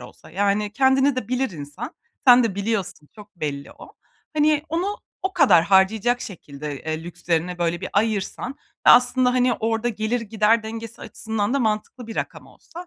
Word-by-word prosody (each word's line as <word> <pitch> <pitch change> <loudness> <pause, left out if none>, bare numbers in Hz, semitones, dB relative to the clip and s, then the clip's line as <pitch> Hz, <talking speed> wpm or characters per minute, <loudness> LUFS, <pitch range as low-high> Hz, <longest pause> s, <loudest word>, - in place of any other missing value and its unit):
olsa, 125 - -14
yani, 205 +3 0
kendini 265 +2 +3
de 225 -5 -3
bilir 255 0 0
insan, 145 -4 -7 0.3
sen 250 -1 +8
de 220 -5 -1
biliyorsun, 200 -6 -3
çok 210 -2 -15
belli 145 -3 -5
o, - - -14 0.4
hani 300 0 +3
onu 365 +6 -1 0.3
o 380 - -1
kadar 260 - +5
harcayacak 205 +6 +3
şekilde, 150 -6 -7
eee, 155 +1 -4
lükslerine 175 0 -2
böyle 170 0 -1
bir - - -4
ayırsan 215 +3 -1 0.4
ve - - +10
aslında 250 +1 +5
hani 250 0 +3
orada 225 +1 -1
gelir-gider 220 0 +1
dengesi 225 +1 -7
açısından 220 +1 -3
da - - +2
mantıklı 220 +1 -2
bir 225 - -8
rakam - - -4
olsa 350 +1 -12
220 Hz, 165 wpm, -23 LUFS, 185-250 Hz, 0.4 s, ve